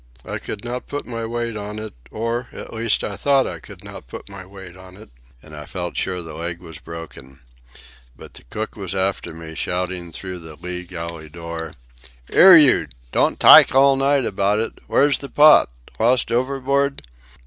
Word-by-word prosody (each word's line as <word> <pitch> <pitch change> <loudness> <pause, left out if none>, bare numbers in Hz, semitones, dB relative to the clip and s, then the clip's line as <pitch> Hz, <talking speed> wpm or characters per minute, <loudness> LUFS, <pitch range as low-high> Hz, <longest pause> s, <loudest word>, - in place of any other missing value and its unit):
I - - -4
could 105 +1 -7
not 125 +1 -5
put 145 - -5
my 115 -2 -5
weight 120 -1 -3
on 105 0 -6
it, 110 0 -7 0.2
or, 115 +3 -3
at - - -9
least, 115 -1 0
I 100 - -3
thought 140 +3 +2
I - - -6
could - - -13
not - - -11
put 65 - -10
my 100 -1 -9
weight 95 -2 -12
on 95 0 -14
it; 110 - -15 0.3
and 75 -1 -12
I 75 0 -9
felt 90 -2 -5
sure 90 -2 -2
the 80 -1 -9
leg 85 +1 -5
was 80 -3 -11
broken. 70 -5 -10 0.8
But - - -13
the - - -12
cook 110 - -5
was 95 -3 -6
after 95 +1 -1
me, 80 0 -9
shouting 90 0 -3
through 90 +2 -7
the 80 -2 -11
lee 90 +3 -7
galley 85 -2 -7
door: 85 -1 -7 0.6
"'Ere, 185 -2 +9
you! 140 - +5 0.2
Don't - - +1
tyke - - +8
all 135 0 +6
night 135 -1 +2
about 100 0 0
it! 110 - -3
Where's 145 0 +3
the 140 - -8
pot? 150 - +6 0.3
Lost 115 +1 +2
overboard? 135 +3 0
100 Hz, 185 wpm, -21 LUFS, 85-120 Hz, 0.8 s, Ere